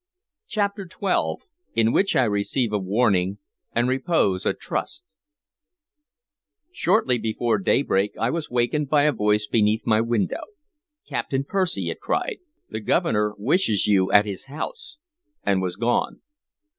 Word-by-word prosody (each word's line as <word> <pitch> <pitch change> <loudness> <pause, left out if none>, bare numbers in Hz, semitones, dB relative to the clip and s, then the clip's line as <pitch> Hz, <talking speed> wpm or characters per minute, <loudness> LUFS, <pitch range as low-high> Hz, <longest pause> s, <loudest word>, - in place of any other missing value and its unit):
CHAPTER 200 -3 -2
XII 185 +2 -1 0.3
IN 115 0 +3
WHICH 195 +8 +2
I 130 - +4
RECEIVE 105 +2 0
A 105 - +1
WARNING 100 -1 +1 0.3
AND 120 +1 +1
REPOSE 130 - +1
A - - +2
TRUST - - -4 1.7
SHORTLY 180 - +2
before 110 0 0
daybreak 100 -1 +1
I 115 +2 +1
was 165 -2 -3
wakened 125 +4 0
by 145 -1 +4
a 150 - +4
voice 105 -3 +1
beneath 105 0 +1
my 110 -1 +3
window. 115 -4 -1 0.7
"Captain 135 0 -2
Percy," 185 +3 -1
it - - -8
cried, 480 -4 -2 0.3
"the 110 - -5
Governor 105 0 +1
wishes 110 - +1
you 95 -3 +3
at 105 +1 +6
his 100 -3 -6
house!" 295 - -7 0.5
and 95 -2 +1
was 90 -1 -2
gone. 120 +4 0
115 Hz, 135 wpm, -24 LUFS, 105-150 Hz, 1.7 s, at